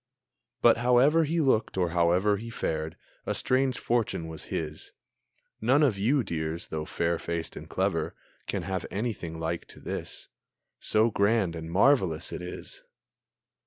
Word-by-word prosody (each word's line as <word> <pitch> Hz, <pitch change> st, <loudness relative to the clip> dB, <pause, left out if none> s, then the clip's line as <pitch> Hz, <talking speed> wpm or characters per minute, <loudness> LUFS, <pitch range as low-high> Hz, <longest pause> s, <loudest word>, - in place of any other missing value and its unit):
But 120 Hz, -, +7 dB
however 125 Hz, +7 st, +4 dB
he 165 Hz, +3 st, 0 dB
looked, 130 Hz, -10 st, +2 dB
or 90 Hz, -2 st, +2 dB
however 90 Hz, +4 st, +3 dB
He 115 Hz, +3 st, -7 dB
fared, 80 Hz, -7 st, -3 dB, 0.3 s
a -, -, 0 dB
strange 130 Hz, 0 st, +1 dB
fortune 115 Hz, -8 st, -1 dB
was 80 Hz, -1 st, -8 dB
his. 75 Hz, -1 st, -5 dB, 0.7 s
None 130 Hz, +7 st, +4 dB
of 130 Hz, -8 st, +3 dB
you, 130 Hz, +6 st, +2 dB
dears, 80 Hz, -3 st, -3 dB
though 80 Hz, -1 st, -3 dB
fair 85 Hz, +1 st, -1 dB
faced 85 Hz, -1 st, -4 dB
and -, -, -9 dB
clever, -, -, -1 dB, 0.3 s
Can -, -, -2 dB
have 95 Hz, -2 st, -3 dB
anything 95 Hz, -7 st, -3 dB
like 80 Hz, +1 st, -3 dB
to -, -, -13 dB
this, -, -, -6 dB, 0.5 s
So 110 Hz, +2 st, +3 dB
grand 100 Hz, -4 st, +2 dB
and 80 Hz, 0 st, -6 dB
so 85 Hz, -, -7 dB
marvelous 95 Hz, -, +3 dB
it -, -, -5 dB
is! 90 Hz, -, -8 dB
95 Hz, 155 wpm, -28 LUFS, 85-120 Hz, 0.7 s, But